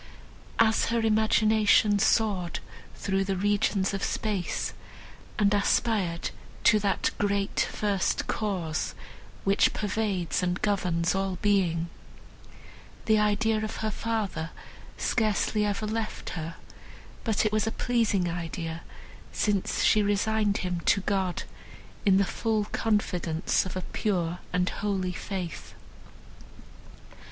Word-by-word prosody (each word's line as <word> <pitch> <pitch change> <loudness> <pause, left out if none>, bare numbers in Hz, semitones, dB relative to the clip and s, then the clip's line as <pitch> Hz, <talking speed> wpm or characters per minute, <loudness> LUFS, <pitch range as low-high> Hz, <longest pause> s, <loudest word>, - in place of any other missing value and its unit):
As 220 -1 +4
her 230 0 +1
imagination 215 -1 +4
soared 200 -5 +1 0.4
through 195 0 0
the 195 0 -1
regions 200 0 +1
of 195 - -3
space, 205 -5 -2 0.6
and 205 -2 +3
aspired 200 -4 +1 0.3
to 215 - +6
that 200 -1 0
Great 200 -1 +1
First 200 -3 0
Cause, 180 -7 -2 0.5
which 195 0 +3
pervades 195 -7 -1
and 180 0 0
governs 180 -5 +1
all 195 -1 -1
being, 180 -5 +2 1.2
the 215 -1 +4
idea 215 +1 +2
of 215 - -4
her 215 - 0
father 210 -7 -2 0.5
scarcely 215 -1 +1
ever 205 +1 -2
left 220 0 -3
her; 165 0 -5 0.7
but 220 -2 +1
it 215 - +2
was 215 0 +1
a - - 0
pleasing 225 -7 +1
idea, 165 -1 -4 0.5
since 205 -3 0
she 215 - +5
resigned 205 0 +1
him 180 -1 -1
to 200 - +4
God 190 -2 -1 0.6
in 190 -1 +6
the 200 - +3
full 215 +1 -1
confidence 185 -7 0
of 185 - -7
a 185 - -2
pure 180 -4 -1
and 180 0 +1
holy 190 -3 -1
faith. 180 -3 -6
200 Hz, 115 wpm, -28 LUFS, 180-215 Hz, 1.2 s, to